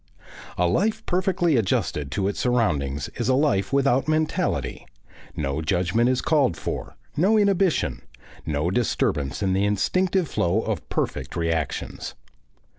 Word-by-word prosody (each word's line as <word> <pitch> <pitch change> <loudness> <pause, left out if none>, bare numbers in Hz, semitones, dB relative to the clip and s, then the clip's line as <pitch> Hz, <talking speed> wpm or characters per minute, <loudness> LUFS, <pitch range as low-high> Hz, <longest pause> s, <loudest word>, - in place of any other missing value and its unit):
A 90 - +2
life 205 - 0
perfectly 180 -4 +1
adjusted 75 -8 0
to 95 +8 -1
its 100 - -3
surroundings 80 - 0
is 120 0 -1
a 130 - +4
life 135 -9 +1
without 135 -1 +2
mentality; 155 0 -1 0.5
no 70 +1 -2
judgment 90 +8 +1
is 130 0 +1
called 140 - +2
for, - - -5 0.2
no 190 +8 +3
inhibition, 195 -4 +2 0.4
no 75 +3 -1
disturbance 85 - 0
of 95 -1 +1
the 95 +1 +1
instinctive 180 - +1
flow 95 -1 0
of - - -4
perfect 65 +1 -2
reactions. 80 -3 -2
115 Hz, 130 wpm, -24 LUFS, -, 0.5 s, a